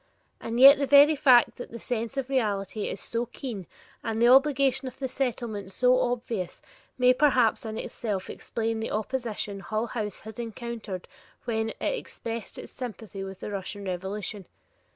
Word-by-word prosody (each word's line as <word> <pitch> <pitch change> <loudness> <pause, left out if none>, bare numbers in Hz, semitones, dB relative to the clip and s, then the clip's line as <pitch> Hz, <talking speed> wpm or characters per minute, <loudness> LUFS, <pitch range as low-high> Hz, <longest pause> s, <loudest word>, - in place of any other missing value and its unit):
And 230 +1 -3
yet 275 +2 +10
the 280 - 0
very 285 +3 +7
fact 255 -4 +5
that 245 - -7
the 230 - -8
sense 235 +2 -3
of 270 -2 -1
reality 210 -6 -1
is - - -5
so 235 +1 -2
keen 225 - -6 0.4
and 225 -1 -2
the 235 +1 +5
obligation 270 0 +4
of 255 - -8
the 265 - -2
Settlement 235 -6 -3
so 250 +4 +4
obvious 235 -7 -2 0.4
may 250 0 +5
perhaps 250 -5 +3
in 220 0 -5
itself 205 -6 -3
explain 225 -1 -3
the 220 - -3
opposition 215 -3 -3
Hull 215 +3 -2
House 215 -4 -4
has 220 +1 -10
encountered 230 -4 -6 0.4
when 220 -2 -1
it - - -7
expressed 230 - -4
its - - -9
sympathy 220 -5 -7
with 190 -1 -8
the - - -5
Russian 200 +1 -5
revolution. 190 +1 -4
230 Hz, 165 wpm, -27 LUFS, 210-255 Hz, 0.4 s, yet